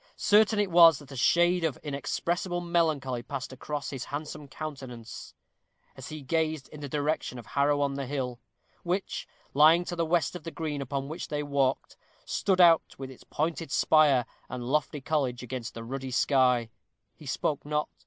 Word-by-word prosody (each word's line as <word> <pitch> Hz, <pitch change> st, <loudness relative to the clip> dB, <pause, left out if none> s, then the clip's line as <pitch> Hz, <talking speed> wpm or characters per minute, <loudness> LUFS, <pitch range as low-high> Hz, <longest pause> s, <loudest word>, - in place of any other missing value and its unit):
Certain 215 Hz, +1 st, +4 dB
it 205 Hz, -3 st, +1 dB
was 165 Hz, -3 st, +8 dB
that 145 Hz, -1 st, -14 dB
a -, -, -7 dB
shade 175 Hz, +6 st, +3 dB
of 155 Hz, -6 st, 0 dB
inexpressible 170 Hz, +5 st, -2 dB
melancholy 155 Hz, -8 st, 0 dB
passed 130 Hz, +1 st, -6 dB
across 145 Hz, +2 st, -5 dB
his 135 Hz, -2 st, -5 dB
handsome 150 Hz, 0 st, -6 dB
countenance, 130 Hz, -6 st, -8 dB, 0.6 s
as -, -, -9 dB
he 155 Hz, -2 st, -7 dB
gazed 155 Hz, 0 st, -1 dB
in 150 Hz, -, -11 dB
the 145 Hz, -1 st, -6 dB
direction 150 Hz, -2 st, -1 dB
of 120 Hz, -, -9 dB
Harrow 145 Hz, +3 st, +1 dB
on 140 Hz, -1 st, +1 dB
the 135 Hz, -1 st, -4 dB
Hill, 125 Hz, -3 st, -3 dB, 0.4 s
which, 180 Hz, +3 st, -3 dB, 0.3 s
lying 160 Hz, +5 st, +6 dB
to 175 Hz, -, -4 dB
the 170 Hz, -, 0 dB
west 165 Hz, -1 st, +1 dB
of 175 Hz, -, -7 dB
the 165 Hz, -, -5 dB
green 155 Hz, -4 st, -4 dB
upon 135 Hz, 0 st, -3 dB
which 160 Hz, +4 st, -6 dB
they 150 Hz, -1 st, -2 dB
walked, 140 Hz, -2 st, 0 dB, 0.3 s
stood 190 Hz, -2 st, 0 dB
out 170 Hz, -2 st, +5 dB
with 135 Hz, -1 st, -7 dB
its 130 Hz, -, -14 dB
pointed 165 Hz, +1 st, -2 dB
spire 145 Hz, -6 st, +4 dB, 0.2 s
and 125 Hz, -1 st, -5 dB
lofty 145 Hz, +2 st, -1 dB
college 130 Hz, -4 st, -1 dB
against 125 Hz, -1 st, -6 dB
the 115 Hz, -, -6 dB
ruddy 135 Hz, +2 st, -5 dB
sky. 125 Hz, -3 st, +2 dB, 0.4 s
He 150 Hz, -, -13 dB
spoke 145 Hz, +2 st, -1 dB
not. 150 Hz, 0 st, -1 dB
145 Hz, 175 wpm, -28 LUFS, 130-160 Hz, 0.6 s, was